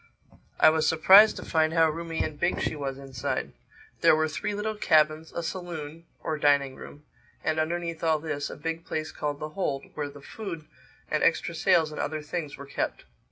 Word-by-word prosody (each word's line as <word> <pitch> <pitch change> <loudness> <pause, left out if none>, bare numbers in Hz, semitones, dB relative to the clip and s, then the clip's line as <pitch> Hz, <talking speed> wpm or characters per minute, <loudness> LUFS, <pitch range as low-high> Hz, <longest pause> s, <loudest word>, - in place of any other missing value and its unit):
I - - +7
was 160 0 +1
surprised 195 +7 +7
to - - -7
find 160 -1 +1
how 165 -1 +5
roomy 165 0 -3
and 150 - -5
big 175 - +1
she - - -1
was 135 -2 -4
inside. 135 -3 -4 0.5
There - - +6
were 155 0 +1
three 205 +6 -3
little 215 +1 -2
cabins, 155 -5 +2
a 170 - -4
saloon 165 -2 -6 0.2
(or 155 -1 -2
dining 140 -2 +3
room) 145 +2 -12 0.4
and 155 0 0
underneath 170 +1 -2
all 160 -1 +3
this, 150 -2 -4
a - - -7
big 165 0 -4
place 155 0 -4
called 145 -1 -3
the 155 - -5
hold 145 -5 -3
where 145 -1 -3
the 145 0 -12
food 170 0 -7 0.5
and - - +1
extra - - +2
sails 160 -2 +3
and 150 - -4
other 155 +1 -3
things 150 -1 -5
were 140 - -9
kept. 140 - -3
155 Hz, 195 wpm, -27 LUFS, 145-165 Hz, 0.5 s, I